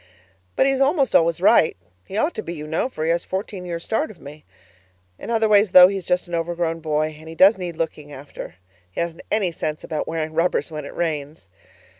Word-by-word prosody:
But - - +3
he 275 - +3
is 270 0 -1
almost 275 -1 +2
always 165 0 +3
right; 185 - +4 0.3
he 195 - -5
ought 305 +10 +1
to - - -4
be, 170 -4 -6
you 150 -1 -7
know, 160 +11 -1
for 155 - -5
he 165 - +2
has 170 +1 0
fourteen 190 -1 -5
years' 170 -1 -5
start 295 +8 -1
of 195 - -13
me. 150 +1 -12 0.7
In - - -8
other 225 -1 +2
ways, 205 -2 +4
though, 180 0 +10
he's 195 -3 -5
just 180 0 0
an 175 - -10
overgrown 165 0 -1
boy, 155 -1 -1
and 160 +1 -12
he 165 - -9
does 195 +6 +6
need 175 -3 -6
looking 155 -3 -4
after 140 - -9 0.3
he 90 - -7
hasn't 170 -1 -3
any 200 -5 +1
sense 155 -1 -4
about 155 - -3
wearing 160 -1 -3
rubbers 165 +1 0
when 150 -2 -6
it - - -9
rains. 150 - -4
170 Hz, 225 wpm, -22 LUFS, 155-195 Hz, 0.7 s, though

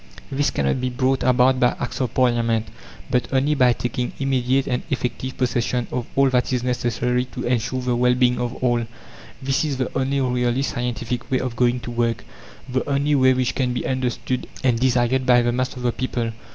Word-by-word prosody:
This 140 +1 +1
cannot 70 - 0
be 130 - 0
brought 130 +2 0
about 130 +1 +3
by 125 -1 +3
Acts 125 - -4
of 125 - -1
Parliament, 115 -3 +1 0.4
but 125 -1 +1
only 135 +2 +2
by 130 -4 +4
taking 125 +1 -3
immediate 135 -1 +1
and 125 -2 -1
effective 130 0 -3
possession 125 -1 0
of 125 -2 -3
all 135 -1 +4
that 125 0 +1
is 125 -2 0
necessary 125 0 0
to 125 0 -7
ensure 125 +1 0
the 125 -1 0
well 125 +1 +3
being 125 -1 +2
of 120 0 -2
all; 120 -2 +1 0.6
this 135 +4 +1
is 145 -4 -2
the 130 - -3
only 135 +1 0
really 125 0 +1
scientific 120 -1 -3
way 130 - +1
of 125 -2 -3
going 125 +1 +2
to 120 - -6
work, 120 -1 -1 0.4
the 130 0 -1
only 140 +1 +1
way 130 -2 +4
which 130 -1 0
can 125 -2 0
be 125 - -3
understood 130 -1 -2 0.2
and 120 -3 +2
desired 125 0 +2
by 120 -1 +5
the 120 - +1
mass 130 +2 -2
of 125 - -7
the 120 - +2
people. 120 -2 -2
125 Hz, 200 wpm, -22 LUFS, 120-130 Hz, 0.6 s, by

